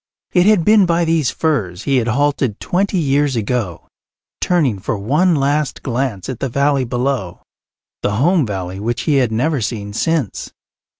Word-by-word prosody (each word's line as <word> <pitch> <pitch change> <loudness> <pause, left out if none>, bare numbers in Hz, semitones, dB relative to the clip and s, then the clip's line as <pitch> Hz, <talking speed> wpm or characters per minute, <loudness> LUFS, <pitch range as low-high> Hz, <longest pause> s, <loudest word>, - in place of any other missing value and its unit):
It 180 +1 +4
had 210 -6 +4
been 210 -3 +5
by 170 0 +2
these 160 -6 +1
firs 105 - -1
he 135 -2 +1
had 120 -2 0
halted 135 -2 0
twenty 190 +2 0
years 145 -3 +1
ago, 110 -5 -2 0.5
turning 145 - +1
for 100 +3 -3
one 150 - +2
last 145 +1 0
glance 120 -6 -2
at 130 -4 -5
the 135 - -2
valley 140 +1 +1
below, 125 -6 -2 0.6
the 100 - 0
home 165 - +3
valley 95 -4 -4
which 115 +3 -2
he 150 -3 +1
had 125 -4 +2
never 135 +5 0
seen 105 -2 -4
since. 150 - -1
135 Hz, 165 wpm, -18 LUFS, 110-155 Hz, 0.6 s, been